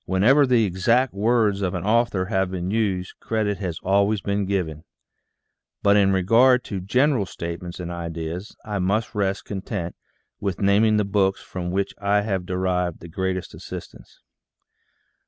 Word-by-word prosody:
Whenever 125 Hz, +10 st, +4 dB
the 120 Hz, -3 st, +4 dB
exact 115 Hz, +7 st, +2 dB
words 105 Hz, -1 st, +2 dB
of 90 Hz, -2 st, -1 dB
an -, -, -3 dB
author 110 Hz, -4 st, +2 dB
have 95 Hz, -2 st, 0 dB
been 90 Hz, 0 st, -3 dB
used, 100 Hz, -5 st, -1 dB
credit 105 Hz, -3 st, -1 dB
has 90 Hz, -5 st, -3 dB
always 100 Hz, +2 st, +2 dB
been 100 Hz, 0 st, -1 dB
given; 85 Hz, -6 st, -2 dB, 1.0 s
but 100 Hz, 0 st, +5 dB
in 100 Hz, -1 st, +4 dB
regard 115 Hz, +7 st, +4 dB
to 100 Hz, -, -4 dB
general 125 Hz, +4 st, +2 dB
statements 85 Hz, 0 st, -6 dB
and 90 Hz, -1 st, -5 dB
ideas, 85 Hz, +2 st, -5 dB
I 105 Hz, -2 st, -3 dB
must 105 Hz, +5 st, 0 dB
rest 100 Hz, -1 st, -1 dB
content 95 Hz, -3 st, -4 dB, 0.4 s
with 100 Hz, -3 st, -3 dB
naming 105 Hz, +2 st, +4 dB
the 105 Hz, -, +2 dB
books 100 Hz, -1 st, +1 dB
from 90 Hz, -1 st, -5 dB
which 95 Hz, +2 st, -1 dB
I 100 Hz, +1 st, +2 dB
have 95 Hz, -4 st, -2 dB
derived 90 Hz, -2 st, -1 dB
the 85 Hz, -, -11 dB
greatest 95 Hz, +1 st, -3 dB
assistance. -, -, -10 dB
100 Hz, 155 wpm, -23 LUFS, 90-105 Hz, 1.0 s, but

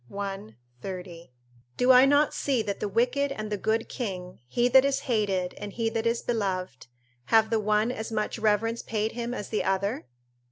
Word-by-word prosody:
i, 195 Hz, -, -5 dB, 0.3 s
30.] 180 Hz, -5 st, -8 dB, 0.5 s
Do 250 Hz, +1 st, +5 dB
I 255 Hz, +1 st, +8 dB
not 285 Hz, +2 st, +3 dB
see 260 Hz, -5 st, 0 dB
that 200 Hz, -1 st, -4 dB
the -, -, -2 dB
wicked 250 Hz, +6 st, +1 dB
and 215 Hz, -5 st, -5 dB
the -, -, +1 dB
good 220 Hz, +3 st, -1 dB
king, 185 Hz, -7 st, -5 dB
he 240 Hz, -, +1 dB
that 260 Hz, +1 st, +6 dB
is 275 Hz, 0 st, 0 dB
hated 200 Hz, -7 st, 0 dB
and 205 Hz, -1 st, -7 dB
he 225 Hz, -1 st, -1 dB
that 225 Hz, 0 st, -1 dB
is 230 Hz, 0 st, 0 dB
beloved, 185 Hz, -, -2 dB, 0.4 s
have 220 Hz, -, +3 dB
the 225 Hz, -, +2 dB
one 215 Hz, +2 st, +1 dB
as 225 Hz, -2 st, -5 dB
much 215 Hz, +1 st, -2 dB
reverence 220 Hz, +2 st, +1 dB
paid 220 Hz, 0 st, -2 dB
him 235 Hz, 0 st, -4 dB
as 210 Hz, -5 st, -5 dB
the 215 Hz, -, -1 dB
other? 195 Hz, -, -1 dB
220 Hz, 190 wpm, -27 LUFS, 195-240 Hz, 0.5 s, I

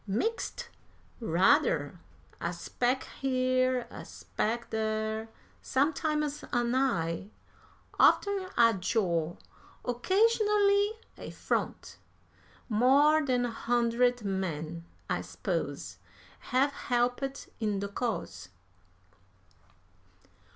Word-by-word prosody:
"Mixed 450 Hz, -, -2 dB, 0.5 s
rather! 165 Hz, -, +2 dB, 0.4 s
A 170 Hz, -, -1 dB
speck 245 Hz, +9 st, -1 dB, 0.2 s
here, 255 Hz, -1 st, +1 dB
a -, -, -8 dB
speck 230 Hz, +2 st, -3 dB
there. 220 Hz, 0 st, -2 dB, 0.3 s
Sometimes 300 Hz, +1 st, 0 dB
an 240 Hz, -1 st, +1 dB
eye, 195 Hz, -9 st, 0 dB, 0.7 s
oftener 395 Hz, -2 st, +4 dB
a 230 Hz, -1 st, +6 dB
jaw, 175 Hz, -4 st, 0 dB, 0.5 s
occasionally 410 Hz, -, +3 dB, 0.3 s
a -, -, -7 dB
front. -, -, -3 dB, 0.7 s
More 280 Hz, +7 st, +4 dB
than 250 Hz, -3 st, +1 dB
a 240 Hz, -, -2 dB
hundred 240 Hz, +1 st, +1 dB
men, 170 Hz, -4 st, -3 dB, 0.2 s
I -, -, -1 dB
s'pose, -, -, -4 dB, 0.5 s
have 270 Hz, +3 st, +3 dB
helped 250 Hz, +2 st, -1 dB
in 210 Hz, -3 st, 0 dB
the 200 Hz, -, -2 dB
cause." 215 Hz, -, -4 dB
245 Hz, 85 wpm, -30 LUFS, 210-275 Hz, 0.7 s, a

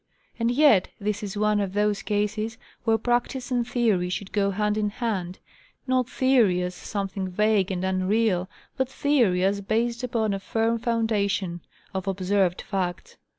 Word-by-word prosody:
And 230 Hz, 0 st, +2 dB
yet 245 Hz, -7 st, +5 dB
this 210 Hz, 0 st, -2 dB
is 205 Hz, -1 st, -5 dB
one 210 Hz, 0 st, +2 dB
of 195 Hz, -2 st, -2 dB
those 210 Hz, 0 st, +1 dB
cases 215 Hz, +2 st, -1 dB, 0.3 s
where 225 Hz, -1 st, +4 dB
practice 245 Hz, +3 st, -1 dB
and 240 Hz, -1 st, +1 dB
theory 215 Hz, -8 st, +1 dB
should 190 Hz, +2 st, -4 dB
go 200 Hz, -1 st, +1 dB
hand 210 Hz, +1 st, 0 dB
in 210 Hz, -1 st, 0 dB
hand,—not 235 Hz, -, -3 dB
theory 235 Hz, -9 st, +3 dB
as 180 Hz, 0 st, -3 dB
something 195 Hz, 0 st, -4 dB
vague 210 Hz, 0 st, +2 dB
and 185 Hz, -1 st, -2 dB
unreal, 190 Hz, 0 st, +1 dB, 0.3 s
but 265 Hz, -1 st, 0 dB
theory 245 Hz, -11 st, +2 dB
as 200 Hz, +1 st, +1 dB
based 230 Hz, +4 st, -1 dB
upon 230 Hz, -4 st, 0 dB
a 195 Hz, -, -2 dB
firm 225 Hz, +3 st, 0 dB
foundation 205 Hz, -6 st, 0 dB, 0.3 s
of 190 Hz, 0 st, -4 dB
observed 190 Hz, -1 st, +1 dB
facts. 180 Hz, -3 st, -3 dB
210 Hz, 150 wpm, -25 LUFS, 190-230 Hz, 0.3 s, yet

